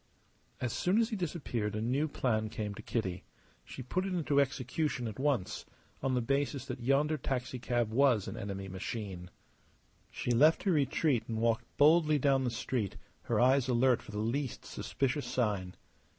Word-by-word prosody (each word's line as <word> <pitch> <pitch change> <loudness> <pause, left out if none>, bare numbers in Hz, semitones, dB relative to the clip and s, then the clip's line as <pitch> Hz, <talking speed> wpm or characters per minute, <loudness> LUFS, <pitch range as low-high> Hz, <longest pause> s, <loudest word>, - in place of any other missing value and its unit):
As 120 -3 -2
soon 185 +4 +1
as 230 0 +3
he 220 - -2
disappeared 135 - -2
a - - -1
new 130 +7 +1
plan 110 -7 0
came 105 -1 -4
to - - -9
Kitty. 95 -6 -3 0.4
She 95 - -8
put 180 +9 -1
it 190 -1 -2
into 145 -4 +3
execution 130 -1 -1
at 110 +1 -7
once, 135 -8 0 0.4
on 130 -1 0
the 125 - +1
basis 140 +1 0
that 125 -2 -6
yonder 140 +5 +2
taxicab 125 -3 -1
was 125 -4 +3
an - - -5
enemy 100 -1 -5
machine. 95 -1 -5 0.8
She 125 - -3
left 150 +7 +5
her 195 - +2
retreat 140 -5 +2
and 115 - -3
walked 115 0 +1
boldly 155 +1 +5
down 135 -1 +2
the - - +1
street, 115 -3 -2 0.3
her - - +1
eyes 130 +1 +4
alert 125 0 +3
for - - -15
the 105 - -5
least 120 +4 -2
suspicious 135 0 -2
sign. 105 -7 -1
125 Hz, 170 wpm, -32 LUFS, 110-140 Hz, 0.8 s, left